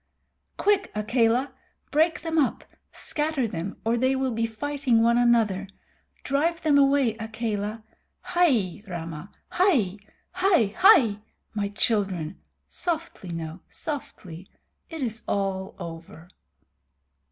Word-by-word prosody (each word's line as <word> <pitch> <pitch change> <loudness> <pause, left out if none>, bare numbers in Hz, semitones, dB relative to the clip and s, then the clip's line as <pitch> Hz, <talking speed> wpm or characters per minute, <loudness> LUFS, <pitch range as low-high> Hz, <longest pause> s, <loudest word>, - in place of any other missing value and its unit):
"Quick, 400 -2 +2
Akela! 235 +4 +1 0.4
Break 315 +2 +2
them 325 0 0
up. 275 - +1 0.3
Scatter 300 -5 -1
them, 180 0 -5
or 230 +1 +2
they 260 +2 +2
will 265 -1 0
be 230 0 0
fighting 255 0 0
one 235 +1 +4
another. 225 -5 +2 0.6
Drive 320 +5 +1
them 295 -2 +4
away, 275 -4 +3
Akela. 220 -1 -3 0.4
Hai, 250 - +1
Rama! 165 -1 -6 0.2
Hai, 255 - +2 0.3
hai, 360 - +2
hai! 320 - +6 0.4
my 205 -2 -1
children. 195 -5 -1 0.3
Softly 330 - -4
now, 165 0 -5
softly! 190 - -7 0.4
It 320 -4 -5
is 225 -2 -2
all 195 -1 -2
over." 165 -1 -9
230 Hz, 110 wpm, -26 LUFS, 195-290 Hz, 0.6 s, hai